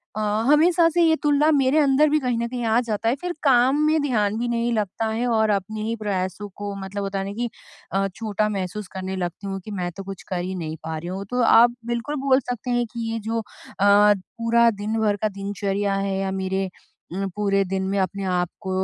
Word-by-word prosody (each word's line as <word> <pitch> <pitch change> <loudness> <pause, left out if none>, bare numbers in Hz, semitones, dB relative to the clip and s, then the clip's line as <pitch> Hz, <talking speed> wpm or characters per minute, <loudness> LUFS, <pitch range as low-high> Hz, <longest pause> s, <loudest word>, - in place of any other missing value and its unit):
अ, - - -3 0.3
हमेशा 330 +3 +5
से 345 +1 +1
ये 320 -1 +5
तुलना 295 +1 +4
मेरे 275 -1 +3
अंदर 290 +1 +4
भी 305 +1 +3
कहीं 250 -4 -1
न 235 - -1
कहीं 245 0 -4
आ 225 +1 +3
जाता 225 -1 -1
है 240 - +1
फिर 355 0 -3
काम 265 +1 +4
में 310 0 +3
ध्यान 215 -7 +1
भी 240 - -1
नहीं 235 0 0
लगता 215 0 -1
है 230 +3 -1
और 220 -2 +2
अपने 210 +2 -1
ही 225 +1 -1
प्रयासों 205 -1 -3
को 205 0 -5
मतलब 200 +1 -4
होता 195 0 -2
नहीं 200 +1 -6
कि 240 +1 -2 0.4
अ, 195 0 +1
छोटा 215 -1 -1
महसूस 195 0 -4
करने 190 0 -4
लगती 180 +1 -4
हूँ 195 0 -3
कि 215 - -7
मैं 180 -3 -3
तो 195 - -5
कुछ 195 -1 -8
कर 185 - -1
ही 185 +1 -4
नहीं 160 -3 -4
पा 160 0 -4
रही 165 +2 -7
हूँ, 190 +2 -5
तो 250 +5 -1
आप 235 +1 +6
बिल्कुल 240 +5 -2
बोल 260 -1 +5
सकते 245 -1 -5
हैं 240 0 +1
कि 230 -1 -3
ये 225 - -2
जो 230 0 0
अ, 225 - -4 0.4
पूरा 210 +3 +4
दिन 215 +1 -3
भर 210 -2 +2
का 215 - +2
दिनचर्या 200 0 -2
है 195 0 -1
या 195 0 -1
मेरे 190 0 -2 0.4
अम, 195 +1 -2
पूरे 200 -1 +2
दिन 190 +1 -2
में 200 - 0
अपने 195 +1 -1
आप 180 -2 0
को 190 - -5
210 Hz, 230 wpm, -23 LUFS, 195-240 Hz, 0.4 s, आप